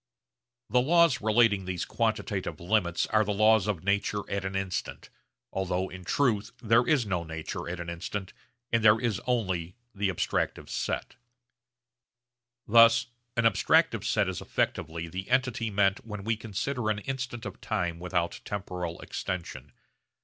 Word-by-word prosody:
The 125 - +4
laws 165 -2 +4
relating 110 -3 +3
these 90 -2 -3
quantitative - - -2
limits 85 -2 +1
are 110 0 +3
the 105 -1 -2
laws 110 -1 +4
of 100 -7 -2
nature 100 +1 0
'at 100 -1 -2
an 95 0 -3
instant,' 95 -1 -4 0.4
although 95 0 -1
in 90 +1 -9
truth 110 -3 +1
there 115 +1 +3
is 145 -7 +3
no 90 -4 -1
nature 80 +1 -5
at 90 0 -4
an 85 - -5
instant 90 +3 -5 0.4
and 115 -1 +2
there 110 +1 +6
is 115 -3 -1
only 95 -8 -1 0.2
the 100 -1 0
abstractive 90 - -1
set. - - -3 1.5
Thus 115 +1 +6 0.3
an 115 - +3
abstractive 115 - +3
set - - +1
is - - -3
effectively 80 +1 -2
the 95 +5 -6
entity 125 -3 +1
meant 100 -1 +2
when 105 -3 -7
we 110 +2 +1
consider 110 +3 -3
an 105 - +1
instant 125 0 -4
of - - -7
time 90 -6 -2
without 85 -1 -2
temporal 90 -4 -4
extension. 80 -8 -5
100 Hz, 150 wpm, -28 LUFS, 90-115 Hz, 1.5 s, there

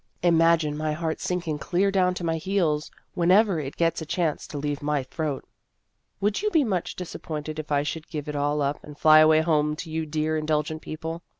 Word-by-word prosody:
Imagine 165 -3 +3
my 155 0 -1
heart 160 0 -3
sink 180 -1 -2
ing 150 -2 -2
clear 185 +6 +1
down 180 -2 +2
to 180 - -5
my 165 -1 0
heels 160 -4 0 0.2
whenever 185 +1 +4
it 140 -2 -6
gets 165 -1 +1
a - - -3
chance 165 -2 -1
to 145 - -7
leave 145 0 -3
my 145 -2 0
throat. 150 +1 -4 0.7
Would 205 - 0
you 425 - +1
be 320 -7 +3
much 190 -8 -2
disappointed 155 -3 -6
if 155 -1 -7
I 145 0 +2
should 160 +2 -5
give 150 -2 -5
it 150 - -4
all 145 +1 0
up, 140 +1 -2
and 150 -1 -11
fly 155 0 +7
away 155 0 +6
home 150 -2 +1
to 160 +1 -7
you 160 0 -2
dear 155 +1 -1
indulgent 155 0 -1
people 160 +2 -6
155 Hz, 210 wpm, -25 LUFS, 150-170 Hz, 0.7 s, fly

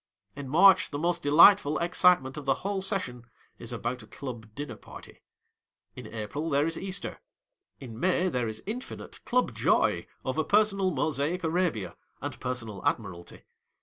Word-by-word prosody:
In 140 -2 -7
March, 190 +6 +6
the 145 - -4
most 170 +2 -1
delightful 155 +1 +6
excitement 170 -5 +3
of 150 -2 -7
the 135 - +2
whole 200 -1 -1
session 155 - -3 0.3
is - - -4
about 125 +1 -4
a 110 - -14
club 120 -1 -8
dinner 145 -6 -6
party. - - -13 0.7
In - - -9
April, 115 +9 -5
there 140 0 +2
is 165 0 -1
Easter. 190 +2 -4 0.6
lu 135 - -9
May, 180 +10 0
there 125 -9 -1
is 110 0 -6
infinite 245 +5 -7
Club 250 0 +1
joy - - +1 0.2
over - - 0
personal 200 -2 +2
Mosaic 155 +3 -1
Arabia, 160 - -1 0.2
and - - -6
personal 120 -5 -5
Admiralty. 85 -1 -3
150 Hz, 150 wpm, -28 LUFS, 125-185 Hz, 0.7 s, March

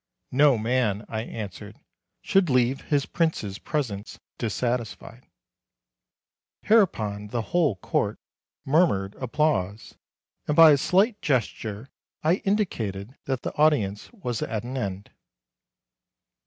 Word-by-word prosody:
"No 140 -1 +5
man," 110 -2 0
I 110 -1 -3
answered, 105 -2 -8 0.4
"should 195 -4 +3
leave 125 +1 +2
his 145 -3 +1
prince's 115 - -1
presence 105 - -4 0.2
dissatisfied." 120 +1 -3 1.4
Hereupon 110 - +2
the 115 +1 -2
whole 165 - +3
Court 95 - -1 0.5
murmured 135 - +2
applause, 115 -7 -1 0.5
and 150 - +1
by 165 -1 +9
a 145 - +5
slight 200 - +2
gesture 115 -3 -2 0.3
I 165 +4 +3
indicated 125 - -2
that 130 -2 -2
the - - -3
audience 125 -10 +2
was 125 - -4
at 110 -1 -3
an 125 +2 -6
end. 100 -5 -4
125 Hz, 110 wpm, -25 LUFS, 105-150 Hz, 1.4 s, by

